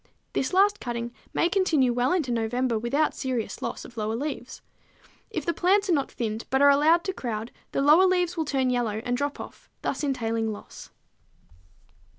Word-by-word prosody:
This 265 - 0
last 405 +2 +4
cutting 235 0 -4 0.2
may - - +2
continue 330 -10 +2
well 245 +2 +1
into 315 -9 0
November 235 +1 0
without 280 +7 +1
serious 255 -4 -3
loss - - -4
of 235 - -14
lower 215 0 -1
leaves. 260 -1 -5 0.7
If 325 -10 -4
the 340 - +1
plants 390 +3 +2
are - - +4
not 280 -3 0
thinned, 220 -1 -3
but 265 - +2
are 285 0 +7
allowed 315 +5 +4
to 385 - -2
crowd, 230 -6 -4 0.2
the 275 - 0
lower 315 +6 +6
leaves 360 -1 +1
will 320 -2 -1
turn 265 -3 +1
yellow 225 -3 -1
and 245 - 0
drop 285 +3 -2
off, - - -10
thus - - -2
entailing 230 -5 -1
loss. 205 - -10
265 Hz, 180 wpm, -26 LUFS, 235-330 Hz, 0.7 s, are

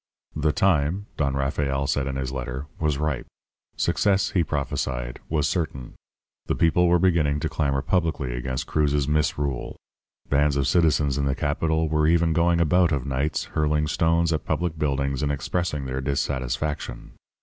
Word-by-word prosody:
"The 75 0 +1
time, 85 +3 +1
Don 70 -2 0
Rafael 70 0 -1
said 70 0 0
in 65 - -3
his 65 -1 -3
letter, 65 +1 -4
was 75 -3 +1
ripe. 75 -2 -2 0.5
Success, 100 -1 +2
he 90 - +2
prophesied, 65 -4 -3
was 75 -2 +1
certain. 70 -8 -3 0.5
The - - 0
people 85 +2 +3
were 90 0 +5
beginning 80 -5 +2
to 80 - -1
clamour 70 -3 0
publicly 80 -8 0
against 65 +1 -3
Cruz's 75 -2 +1
misrule. 75 -3 -1 0.5
Bands 70 0 +2
of 70 -1 +1
citizens 75 -5 +2
in 70 - +1
the 70 0 0
capital 80 +2 0
were 75 0 +2
even 85 0 +3
going 85 +1 +3
about 85 +1 +3
of 70 -4 -1
nights 70 +3 -1
hurling 75 0 +1
stones 80 +2 +2
at 75 - -1
public 85 -3 -2
buildings 70 -2 0
and 75 -1 0
expressing 75 0 -2
their 65 0 -3
dissatisfaction. 65 -1 -2
75 Hz, 160 wpm, -24 LUFS, 70-80 Hz, 0.5 s, were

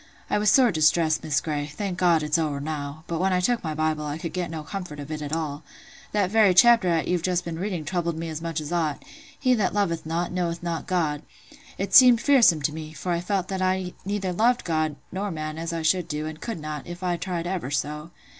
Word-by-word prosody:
I - - +2
was 210 0 +3
sore 250 0 +5
distressed, 155 -1 +2
Miss 150 -4 +1
Grey—thank 155 +5 -4
God, 170 -3 +3
it's 150 +2 +1
owered 145 -3 -2
now—but 155 +2 -4
when 190 +1 +2
I 180 - +2
took 235 +6 +1
my 155 -2 -3
Bible, 155 0 0
I 150 0 -3
could 165 0 -6
get 180 -1 -2
no 160 -2 -5
comfort 175 -3 -6
of 145 +2 -7
it 155 -1 -4
at 145 -1 -5
all. 155 -2 -3 0.5
That 200 -3 +1
very 210 -4 +5
chapter 235 -1 +6
"at 165 -2 +1
you've 180 -1 +1
just 180 0 0
been 165 -1 -5
reading 180 -5 -3
troubled 170 0 -2
me 165 +1 -4
as 160 -1 -5
much 165 -1 -3
as 150 +1 -6
aught—'He 250 - -2
that 210 -4 0
loveth 170 -5 0
not, 170 +2 -1
knoweth 175 -1 -2
not 170 -2 -3
God.' 155 -5 0 0.6
It 195 0 -3
seemed 250 -3 +8
fearsome 235 - +4
to 150 - 0
me; 155 0 -7
for 170 +4 -4
I 170 - +1
felt 185 +1 -1
that 190 -1 -2
I 185 0 +2
loved 180 -1 -5
neither 195 -2 -2 0.3
God 155 -3 0 0.2
nor 200 +3 -3
man 155 -2 -5
as 165 +1 -3
I 165 -1 -3
should 170 +2 +2
do, 150 -2 -3
and 155 0 -7
could 230 -8 -4
not, 150 -1 -6
if 175 +2 -8
I 180 -1 +1
tried 175 -1 -4
ever 175 -7 -3
so. 150 +2 -3
170 Hz, 230 wpm, -25 LUFS, 155-185 Hz, 0.6 s, seemed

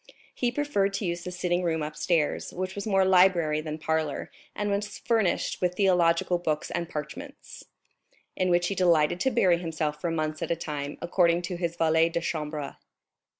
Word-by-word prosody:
He 245 -1 0
preferred 240 -8 0
to 200 - -2
use 175 0 -3
the 180 - -4
sitting 180 0 -1
room 160 -3 0
upstairs, 155 +1 -1
which 185 +1 -3
was 200 +2 -5
more 195 -2 +3
library 180 -5 +4
than 155 0 -5
parlor, 160 -2 -2 0.2
and 205 0 -1
was 205 +1 -2
furnished 220 -6 0
with 180 -1 0
theological 175 -2 +3
books 155 -3 -2
and 170 -1 -3
parchments, 165 - -8 0.7
in 185 -1 0
which 175 0 +2
he - - -1
delighted 175 -3 +3
to 265 - +2
bury 185 -8 +3
himself 155 -3 -3
for 175 - -1
months 155 -1 -2
at - - -3
a 170 - +1
time, 145 -3 -5
according 170 -1 +2
to 175 +1 -4
his 170 -1 -3
valet 160 0 +3
de 170 0 -1
chambre. 150 -3 -4
175 Hz, 180 wpm, -27 LUFS, 160-185 Hz, 0.7 s, library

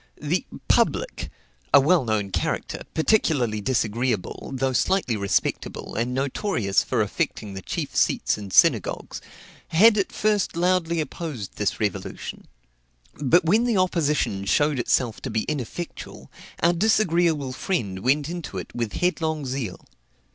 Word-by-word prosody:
The 155 +5 -1 0.2
"public," - - +1 0.4
a 140 - +8
well 155 +4 +4
known 110 -4 -1
character, - - -2
particularly 145 - +2
disagreeable, 115 -2 -1
though 135 0 -1
slightly 180 -4 +1
respectable, 100 -1 -2
and 120 +3 -1
notorious 130 - 0
for - - +1
affecting 105 -2 -3
the 95 - -6
chief - - -4
seats - - +2
in 105 -2 -8
synagogues, - - +2 0.5
had 210 +6 +5
at 195 - -1
first 210 -4 0
loudly 170 -2 +1
opposed 150 - -6
this 105 - -1
revolution; 105 -4 -4 0.7
but 165 +5 +3
when 215 +8 +3
the 235 -4 +1
opposition 150 - +1
showed 145 +6 +2
itself 120 -1 0
to 130 - -4
be 110 -1 -1
ineffectual, 155 +4 -6 0.3
our 170 +1 +5
disagreeable 170 -8 +2
friend 115 - -2
went 140 +6 +1
into 170 - -6
it 90 - -7
with 115 -3 -3
headlong 160 -4 -1
zeal. 125 -7 -4
140 Hz, 135 wpm, -24 LUFS, 110-175 Hz, 0.7 s, a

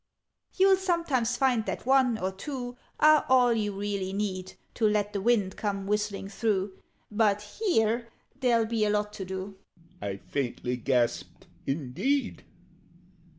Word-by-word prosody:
"You'll 385 0 +5
sometimes 335 - 0
find 250 -5 +2
that - - -4
one 260 -3 +4
or 190 -2 -2
two 245 +4 -6 0.2
Are 305 0 +6
all 250 -2 +5
you 210 -2 0
really 200 -2 -2
need 190 -2 -3 0.2
To 225 - +2
let 210 -1 0
the 200 - -2
wind 205 -4 +2
come 200 -2 -2
whistling 210 -1 -1
through 195 -2 -1 0.4
But 210 - 0
here 235 - +2 0.3
there'll 235 -4 +3
be 220 -1 0
a 210 - +2
lot 210 0 0
to 190 - -6
do!" 190 +1 -6 0.4
I 100 -1 -3
faintly 125 +1 -3
gasped 120 -1 -1 0.2
"Indeed! 165 - -1
210 Hz, 140 wpm, -28 LUFS, 195-245 Hz, 0.4 s, Are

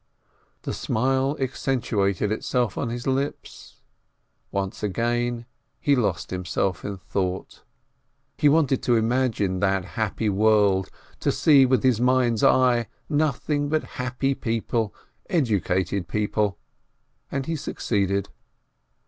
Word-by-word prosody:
The - - -3
smile 135 +5 0
accentuated 110 -7 0
itself 120 +1 -1
on 125 - -2
his 120 +1 -5
lips. 135 +2 -3 0.8
Once 95 -1 -3
again 120 +3 -1 0.3
he 145 - +3
lost 100 -7 -1
himself 90 0 -2
in 100 -1 -4
thought. 95 0 -3 0.7
He 150 - +4
wanted 140 -3 +3
to 120 - +2
imagine 110 -5 +1
that 95 -2 +1
happy 110 +1 -2
world, 100 -2 +3 0.3
and - - +3
see 140 -4 +5
with 130 -3 +2
his 125 -3 +3
mind's 125 -3 +2
eye 125 -3 +4 0.2
nothing 145 -1 0
but 155 0 +1 0.2
happy 130 +2 0
people, 115 -3 -1 0.4
educated 100 - 0
people, 105 -1 0 0.7
and 135 -1 -2
he 165 - -2
succeeded. 100 -8 -1
115 Hz, 115 wpm, -24 LUFS, 100-130 Hz, 0.8 s, see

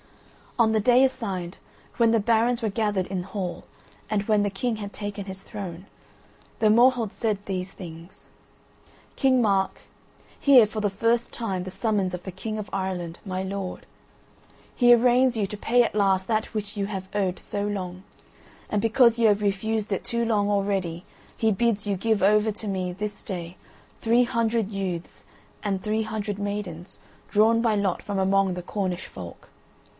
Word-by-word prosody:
On 225 -2 +4
the 220 - +3
day 245 +4 +5
assigned, 195 -9 -2 0.4
when 230 -1 +4
the 230 - +4
barons 230 +3 +2
were 220 - 0
gathered 205 -3 0
in 185 -2 -3
hall, 190 -2 -5 0.5
and 210 -2 0
when 210 -1 +2
the 205 - +1
King 225 +4 -2
had 205 -1 -7
taken 205 -1 -5
his 190 -1 -8
throne, 185 -4 -7 0.7
the 215 - +4
Morholt 235 -1 +4
said 215 -3 -1
these 185 -1 -3
things: 170 -1 -11 0.9
"King 260 -2 +3
Mark, 195 -2 +1 0.6
hear 265 -5 +7
for 215 +1 -5
the 205 -1 +1
last 230 +1 +2
time 195 -6 -3
the 185 - -7
summons 195 -2 0
of 180 - -9
the 190 - -6
King 215 +4 -5
of 210 -1 -5
Ireland, 180 -3 -3
my 185 -1 -3
lord. 195 -1 -5 0.9
He 240 -1 +7
arraigns 245 +1 +4
you 210 - +1
to 210 +1 -6
pay 240 +4 +3
at 230 - -3
last 195 -2 +2
that 220 0 -1
which 210 -1 -4
you 200 -1 -1
have 190 -2 -5
owed 195 -3 0
so 205 0 -3
long, 185 -3 -4 0.7
and 210 - 0
because 235 +1 +4
you 230 - +5
have 205 -1 +3
refused 210 +2 -1
it 195 - -2
too 235 0 -1
long 210 -3 +1
already 195 -4 -1 0.3
he 220 -1 +2
bids 215 0 +1
you 200 -1 0
give 220 +2 0
over 210 +2 +4
to 215 +1 -7
me 185 -2 -2
this 205 +3 -5
day 175 -2 -6 0.5
three 235 +2 +4
hundred 230 -3 0
youths 185 -4 -5 0.4
and 195 -3 -1
three 220 +1 0
hundred 210 -2 -4
maidens 200 -4 -5 0.3
drawn 225 +2 +4
by 225 -2 +2
lot 200 -3 0
from 205 -1 -4
among 190 -1 +2
the 180 - -5
Cornish 185 -2 -3
folk. 90 -2 -10
205 Hz, 175 wpm, -25 LUFS, 190-225 Hz, 0.9 s, hear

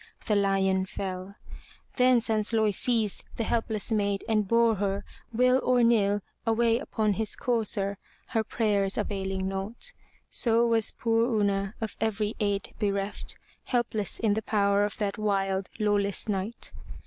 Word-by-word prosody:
The 210 - +1
lion 195 -1 +2
fell. 190 0 -5 0.6
Then 250 -2 +5
Sansloy 220 -1 +1
seized 225 -2 +2
the 230 - 0
helpless 225 -1 -1
maid, 200 -2 0
and 215 -2 +1
bore 230 0 +3
her, 200 0 -2 0.3
will 250 +3 +3
or 250 -1 +3
nill, 205 -3 +3 0.2
away 230 0 +2
upon 215 -6 0
his 215 +1 -2
courser, 205 -4 -1 0.3
her 225 -3 0
prayers 205 -3 0
availing 195 -2 -2
naught. 195 - -3 0.3
So 230 0 +3
was 230 -2 +3
poor 230 0 +1
Una, 200 0 0
of 220 -1 -4
every 215 -1 0
aid 205 -2 -1
bereft, 200 -1 -1 0.3
helpless 220 -5 0
in 220 -3 +2
the 220 - -1
power 205 -1 +2
of 205 - -5
that 205 -1 -2
wild, 195 -2 0
lawless 205 -2 0
knight. 210 +3 -3
210 Hz, 140 wpm, -27 LUFS, 200-225 Hz, 0.6 s, Then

